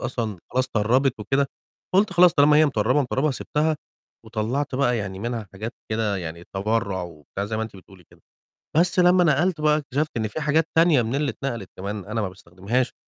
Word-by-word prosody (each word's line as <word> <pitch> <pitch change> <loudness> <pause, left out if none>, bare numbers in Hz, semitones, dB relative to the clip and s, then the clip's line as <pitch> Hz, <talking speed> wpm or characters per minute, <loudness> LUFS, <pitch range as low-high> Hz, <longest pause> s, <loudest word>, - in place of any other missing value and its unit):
أصلًا 115 -6 -3
خلاص 130 +1 +2
طرّبِت 120 +3 +1
وكده، 135 +6 +1 0.5
فقُلت 195 +2 +3
خلاص 175 -1 +6
طالما 150 0 +5
هي 155 - +6
مطّربة، 125 +1 +2
مطرّبة 135 +3 0
سِبتها 150 +3 0 0.5
وطلَّعت 120 +6 -2
بقى 125 -2 +2
يعني 100 -3 -4
منها 115 -1 -4
حاجات 110 +4 -5 0.2
كده 110 -2 0
يعني 85 -1 -6
تبرُّع 100 -2 -1
وبتاع 85 +3 -6
زي 110 +2 -3
ما 110 - -1
أنتِ 110 -2 -7
بتقولي 95 -1 -16
كده. - - -21 0.6
بس 170 +2 +3
لمّا 180 0 +5
نَقَلْت 160 +1 +2
بقى، 150 0 +4
اكتشفت 150 +1 -2
إن 110 -1 0
فيه 160 - -5
حاجات 150 +2 +2
تانية 165 -5 +5
من 115 +3 -2
اللي 145 0 0
اتنقلت 115 -8 -5
كمان 100 +1 -5
أنا 110 +2 -2
ما 100 - -1
باستخدمهاش 95 +7 -3
120 Hz, 190 wpm, -24 LUFS, 105-150 Hz, 0.6 s, خلاص